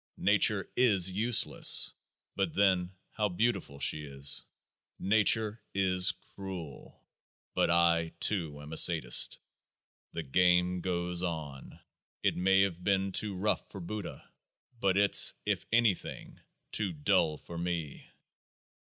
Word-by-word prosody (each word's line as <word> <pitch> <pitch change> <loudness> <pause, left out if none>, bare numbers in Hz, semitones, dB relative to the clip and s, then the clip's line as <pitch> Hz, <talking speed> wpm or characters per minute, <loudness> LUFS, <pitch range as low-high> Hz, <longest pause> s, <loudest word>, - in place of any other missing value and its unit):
Nature - - +1
is 100 -7 +3
useless; 110 +5 +4 0.4
but - - -3
then 95 -3 +1 0.2
how 105 -2 -2
beautiful 100 -7 -2
she 75 +1 -2
is! 70 -1 0 0.5
Nature 110 +2 +1
is 90 -1 +4
cruel; 95 -7 -11 0.5
but - - 0
I 85 -1 +1
too 80 -8 -1
am 75 +2 -10
a - - -6
Sadist. 80 -8 +4 0.8
The 85 - -5
game 90 +4 +1
goes 90 -1 -3
on; 80 -6 -7 0.4
it - - +1
may 95 +2 +2
have 90 -3 -2
been 95 0 0
too 100 +1 -3
rough 100 +4 -2
for 100 - -10
Buddha, 100 +3 -8 0.5
but 95 -2 0
it's 100 0 +5
(if - - -3
anything) 115 -5 -2 0.3
too 100 -4 -2
dull 75 0 0
for 85 - -12
me. 85 -5 -6
90 Hz, 120 wpm, -29 LUFS, 85-100 Hz, 0.8 s, it's